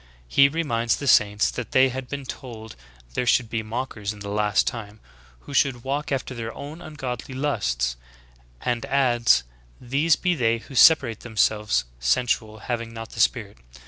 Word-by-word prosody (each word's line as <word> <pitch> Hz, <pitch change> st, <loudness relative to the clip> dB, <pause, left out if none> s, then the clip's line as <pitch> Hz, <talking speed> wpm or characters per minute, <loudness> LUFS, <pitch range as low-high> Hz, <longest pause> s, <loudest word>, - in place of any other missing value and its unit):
He 140 Hz, -, +5 dB
reminds 120 Hz, -7 st, 0 dB
the 145 Hz, -, -6 dB
saints 105 Hz, -5 st, +4 dB
that 125 Hz, -, -6 dB
they 130 Hz, 0 st, +5 dB
had 130 Hz, 0 st, -6 dB
been 140 Hz, -1 st, -5 dB
told 115 Hz, -4 st, -8 dB, 0.4 s
''there 125 Hz, -, -1 dB
should 120 Hz, -2 st, +2 dB
be 115 Hz, -, -1 dB
mockers 110 Hz, -2 st, -4 dB
in 105 Hz, -, -13 dB
the 100 Hz, -, -6 dB
last 105 Hz, 0 st, +2 dB
time, 110 Hz, -2 st, -5 dB, 0.4 s
who 145 Hz, -, -10 dB
should 135 Hz, -4 st, +2 dB
walk 140 Hz, +3 st, -3 dB
after 135 Hz, -1 st, -2 dB
their 115 Hz, -2 st, -5 dB
own 150 Hz, +4 st, -8 dB
ungodly 130 Hz, -4 st, -6 dB
lusts;" 65 Hz, -, -1 dB, 0.6 s
and 120 Hz, -1 st, -1 dB
adds 120 Hz, -, +3 dB, 0.4 s
"These 140 Hz, +6 st, +2 dB
be 180 Hz, -1 st, 0 dB
they 115 Hz, -7 st, +1 dB
who 115 Hz, -, -13 dB
separate 130 Hz, -4 st, +5 dB
themselves, 105 Hz, -, +1 dB
sensual, 110 Hz, -, 0 dB
haying 115 Hz, 0 st, -4 dB
not 115 Hz, 0 st, -7 dB
the -, -, -9 dB
Spirit." 105 Hz, -, +1 dB
120 Hz, 165 wpm, -24 LUFS, 110-135 Hz, 0.6 s, He